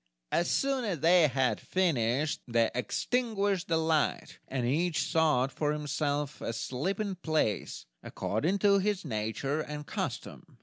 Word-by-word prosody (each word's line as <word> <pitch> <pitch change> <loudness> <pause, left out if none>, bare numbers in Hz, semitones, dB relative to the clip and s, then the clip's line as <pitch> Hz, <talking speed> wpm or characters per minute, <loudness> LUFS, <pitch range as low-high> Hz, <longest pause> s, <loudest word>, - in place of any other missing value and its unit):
As 175 - +1
soon 270 -2 +1
as 185 - -2
they 170 -1 +6
had 130 -1 +1
finished, 150 -5 0
they 115 -1 +2
extinguished 200 - 0
the 165 - +2
light, 160 -1 0
and 130 -2 -2
each 160 +6 +1
sought 150 -5 +2
for 150 +1 -1
himself 150 -1 -2
a 115 - -3
sleeping 190 - -2
place, 155 - -1 0.2
according 155 - -1
to 200 -1 +6
his 200 -2 -1
nature 135 +5 -2
and 150 -1 -6
custom. - - -5
155 Hz, 135 wpm, -30 LUFS, 130-180 Hz, 0.2 s, they